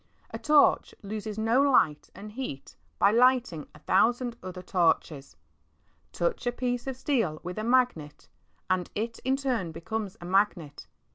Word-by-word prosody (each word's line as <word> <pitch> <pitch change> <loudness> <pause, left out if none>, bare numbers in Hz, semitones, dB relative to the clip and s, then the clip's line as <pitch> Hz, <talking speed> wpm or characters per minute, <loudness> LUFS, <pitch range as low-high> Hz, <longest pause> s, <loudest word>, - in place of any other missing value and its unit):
A - - -6
torch 300 -1 +3
loses 210 +1 -5
no 225 +4 +2
light 250 - +2
and 210 +1 -9
heat 215 - -7 0.2
by - - +4
lighting 245 - +2
a - - -12
thousand 235 - +1
other 185 -1 -8
torches. 160 - 0 0.8
Touch 175 +8 -2
a - - +2
piece 245 0 -3
of 265 -2 -4
steel 225 - 0
with 180 +3 -5
a - - -3
magnet, 235 -12 0 0.4
and 185 -2 0
it 225 +2 -3
in 260 +1 0
turn 250 -11 -2
becomes 200 +4 -5
a 175 - -9
magnet. 180 -5 0
215 Hz, 150 wpm, -28 LUFS, 175-245 Hz, 0.8 s, by